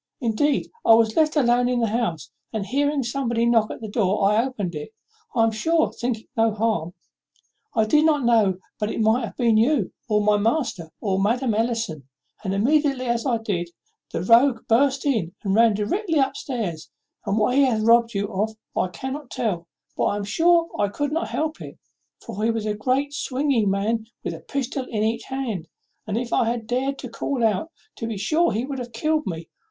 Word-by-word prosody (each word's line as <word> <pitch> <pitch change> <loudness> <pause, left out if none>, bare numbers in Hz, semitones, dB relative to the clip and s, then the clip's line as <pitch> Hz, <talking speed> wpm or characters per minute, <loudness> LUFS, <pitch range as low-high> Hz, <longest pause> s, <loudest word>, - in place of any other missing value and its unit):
Indeed, 265 +4 0
I 225 - +7
was 225 -1 +2
left 310 0 +3
alone 245 -3 +3
in 250 -1 +1
the 230 - +2
house; 205 - -2 0.2
and, 215 -3 -3
hearing 285 +3 0
somebody 235 -2 -1
knock 230 -2 +3
at - - -7
the 220 - -5
door, 205 -2 +1
I 220 +2 +3
opened 210 -9 -4
it 150 +8 -7 0.4
I 230 - +4
am 225 - +3
sure 320 +9 +1
thinking 240 -3 -3
no 225 0 +3
harm. 205 -6 -1 0.8
I 220 -1 +3
did 300 +8 +4
not 295 -5 +2
know 215 -6 +3 0.2
but 210 -1 -1
it - - -3
might 220 +3 +3
have 215 - -10
been 230 -3 +3
you, 230 -3 +2 0.2
or 210 -1 +3
my 210 0 +4
master, 215 - -1
or 195 -2 0
Madam 235 +3 +1
Ellison; 220 - -2 0.4
and 190 - -2
immediately 270 +5 +2
as 235 +2 0
I 240 -3 +2
did, 190 -6 -3 0.4
the - - -3
rogue 230 +3 +5
burst 265 +4 +2
in 215 - 0
and 195 -2 0
ran 225 0 +5
directly 325 - -1
up 270 -1 +2
stairs, 205 - -4 0.4
and 200 - +1
what 220 +3 +2
he 280 - +5
hath 225 -4 +1
robbed 230 0 +4
you 200 +1 0
of 215 +3 -1 0.2
I - - +1
cannot 265 +7 -6
tell; 180 -7 -2 0.3
but - - 0
I - - +1
am 205 - -3
sure 335 +10 +3
I 205 - +3
could 290 +8 -3
not 325 +2 -1
help 315 0 -2
it, - - -9 0.5
for 210 - -5
he 225 - +3
was 225 -2 -1
a 210 - 0
great 260 +7 0
swinging 270 -6 0
man 215 +3 0 0.2
with - - -3
a 165 - -8
pistol 265 - -3
in 215 -4 -2
each 225 +1 -1
hand; 235 -11 -4 0.4
and, 210 0 -1
if 240 0 -3
I - - +3
had 235 -1 -3
dared 260 +4 -1
to 255 - -7
call 240 +2 -3
out, 220 - +1 0.3
to 230 - -4
be 225 -3 -4
sure 315 - +2
he 225 +4 -1
would 270 -1 -5
have 240 -1 -7
killed 310 +6 0
me. 165 -2 -5
230 Hz, 205 wpm, -23 LUFS, 210-265 Hz, 0.8 s, I